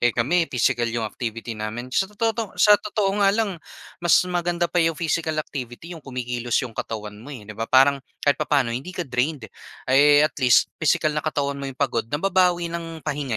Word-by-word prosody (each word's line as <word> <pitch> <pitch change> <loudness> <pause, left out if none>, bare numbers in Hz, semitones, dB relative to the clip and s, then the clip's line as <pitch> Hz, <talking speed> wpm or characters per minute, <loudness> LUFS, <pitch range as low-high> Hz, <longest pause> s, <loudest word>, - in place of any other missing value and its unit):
eh, 120 -1 +2
kami 165 +9 +2
pisikal 120 -1 +1
yung 115 0 -2
activity 115 +1 -5
namin. 110 +4 -5
Sa 190 - +2
tototo 225 0 -2
sa 210 -1 +6
totoo 205 -1 -1
nga 200 - +5
lang 210 -5 -1 0.4
mas 175 -1 +5
maganda 175 0 0
pa 180 - 0
yung 165 0 +2
physical 160 -1 -1
activity 135 +6 -8
yung 165 - -9
kumikilos 125 -3 -3
yung 120 - -8
katawan 105 -2 -6
mo, 120 - -12
eh, 115 - -10
'di 110 - -9
ba 115 +2 -4
parang 135 +1 +5 0.2
kahit 145 - +3
papaano 140 -5 +1
hindi 135 +10 -5
ka 180 - -1
drained 130 +1 -2 0.5
eh, 145 +2 +6
at 155 - 0
least 125 -3 +4
pisikal 155 0 +2
na 150 - -1
katawan 140 -2 -2
mo 140 - -4
'yong 130 - -9
pagod 120 -5 -1
nababawi 175 +2 +1
ng 165 -2 -6
pahinga 140 -6 -2
145 Hz, 200 wpm, -23 LUFS, 120-170 Hz, 0.5 s, sa